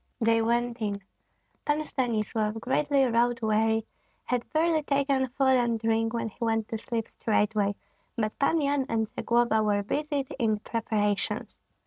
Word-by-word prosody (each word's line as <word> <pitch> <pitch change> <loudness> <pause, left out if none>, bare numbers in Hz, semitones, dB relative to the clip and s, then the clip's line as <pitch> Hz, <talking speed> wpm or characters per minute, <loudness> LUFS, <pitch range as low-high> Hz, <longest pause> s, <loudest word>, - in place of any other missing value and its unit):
They 230 -1 +3
went 235 +1 0
in. 205 -2 -1 0.6
Pan 300 +1 0
Stanislav, 220 -4 -1
greatly 280 +3 +2
road 240 0 +2
weary, 220 +1 +2 0.4
had 245 -1 -2
barely 320 0 +2
taken 275 -2 +1
food 265 +1 +2
and 235 -2 +1
drink 225 0 +1
when 230 -1 -2
he 220 - -8
went 225 -1 0
to 225 - -3
sleep 230 0 -3
straightway; 210 -2 0 0.4
but 215 -2 -2
Pan 320 +4 +3
Yan 280 -2 +1
and 220 -1 0
Zagloba 235 -2 +2
were 205 -1 +1
busied 285 +4 -2
in 220 -3 +2
preparations. 210 -2 -1
230 Hz, 145 wpm, -28 LUFS, 220-265 Hz, 0.6 s, They